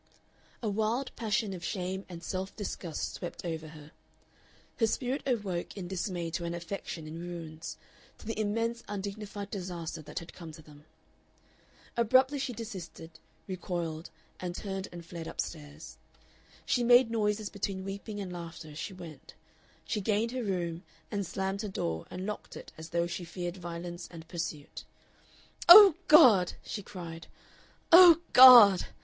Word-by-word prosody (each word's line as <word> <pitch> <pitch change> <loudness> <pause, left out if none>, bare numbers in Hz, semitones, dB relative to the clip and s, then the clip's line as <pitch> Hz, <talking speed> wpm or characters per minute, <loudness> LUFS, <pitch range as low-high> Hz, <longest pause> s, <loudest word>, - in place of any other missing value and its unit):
A - - -1
wild 220 +6 -1
passion 220 -2 -1
of 175 -2 -8
shame 190 0 -4
and 170 -1 -9
self 190 +1 -4
disgust 180 -6 -5
swept 175 0 -7
over 160 -2 -4
her. 150 -1 -13 0.9
Her 225 - +3
spirit 255 +5 -2
awoke 205 -8 -2
in 185 -3 -5
dismay 175 -2 -3
to 170 +1 -3
an 170 0 -3
affection 170 -1 -6
in 155 +2 -8
ruins, 165 -2 -7 0.4
to - - -15
the 225 0 -4
immense 230 +2 -1
undignified 205 0 -6
disaster 175 -5 -5
that 150 - -11
had 170 - -6
come 165 -3 -10
to 155 - -13
them. 150 0 -17 1.1
Abruptly 260 +5 +3
she 265 -1 -2
desisted, 185 -8 -9 0.3
recoiled, 170 -4 -4 0.3
and 175 -1 -5
turned 195 -1 -5
and 175 -1 -10
fled 165 -1 -8
up - - -10
stairs. 150 -1 -6 0.7
She 245 - +1
made 245 0 +6
noises 210 -1 -1
between 195 -2 -4
weeping 200 +2 -6
and 185 -3 -5
laughter 165 -2 -8
as 150 - -9
she 195 - -5
went. 170 -4 -12 0.5
She 215 - -2
gained 215 +3 0
her 255 0 -3
room, 175 -5 -3 0.3
and 200 -3 -2
slammed 195 +2 -3
her 215 - -4
door 80 - -3
and 185 +1 -6
locked 210 0 -6
it - - -11
as 160 +1 -10
though 170 0 0
she 175 +1 -5
feared 175 +1 -6
violence 175 0 -7
and 165 -2 -11
pursuit. 160 -4 -6 0.9
"Oh 395 0 +12
God!" 240 - +7
she 205 - -5
cried, 170 -4 -9 0.6
"Oh 340 -1 +9
God!" 240 -7 +10
185 Hz, 155 wpm, -30 LUFS, 170-215 Hz, 1.1 s, Oh